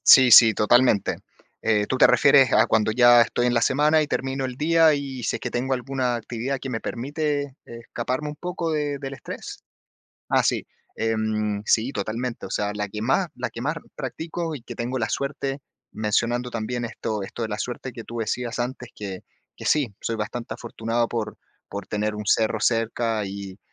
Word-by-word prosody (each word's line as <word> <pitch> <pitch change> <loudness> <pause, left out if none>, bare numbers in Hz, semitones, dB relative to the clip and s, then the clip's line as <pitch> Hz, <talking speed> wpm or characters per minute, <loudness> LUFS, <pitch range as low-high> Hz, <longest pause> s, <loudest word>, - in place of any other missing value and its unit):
Sí, 130 -2 +8
sí, 115 0 +10
totalmente. 110 -2 +3 0.4
Eh, 105 -2 +2
¿tú 130 - -1
te - - +8
refieres 140 -3 +5
a 110 - +6
cuando 110 -1 +2
ya 120 +1 +7
estoy 120 +1 +1
en 120 - +2
la 120 - +2
semana 150 +6 +3
y 150 - -1
termino 135 -1 -2
el 125 -1 -5
día, 160 0 +4
y 135 -3 -5
si 110 - -1
es - - -4
que - - -4
tengo 130 +2 -1
alguna 125 -1 -1
actividad 120 +3 -3
que 135 - -6
me 115 - -2
permite 145 +3 -3
escaparme 120 +4 -4
un 150 - -7
poco 175 0 -3
del 145 -3 -2
estrés? - - -8 0.7
Ah, - - +3
sí. - - +1 0.3
Em, 110 -2 -1
sí, 115 +3 +2
totalmente. 115 +3 -3
O - - -11
sea, 105 0 -1
la 105 -1 -3
que 105 +2 -5
más 135 +10 +2
la 125 -1 -4
que 115 - -8
más 150 +6 -1 0.2
practico 165 0 -4
y 135 - -8
que - - -9
tengo 125 +2 -2
la 110 - 0
suerte, 140 +3 -2 0.3
mencionando 115 +3 0
también 120 +1 -3
esto 110 -2 -4
esto 115 - -6
de 110 - -2
la 105 -1 -4
suerte 125 +3 -5
que 115 -1 -8
tú 120 - -7
decías 120 +2 -2
antes, 125 0 -4
que 95 -3 -7 0.3
que - - -10
sí, 135 -9 +1
soy 115 - -2
bastante 115 +2 -4
afortunado 115 0 -2
por 115 -3 -3 0.3
por 100 -1 -6
tener 105 0 -1
un 105 0 -6
cerro 110 +1 +2
cerca, 115 -1 0
y 100 0 -7
120 Hz, 190 wpm, -24 LUFS, 110-135 Hz, 0.7 s, sí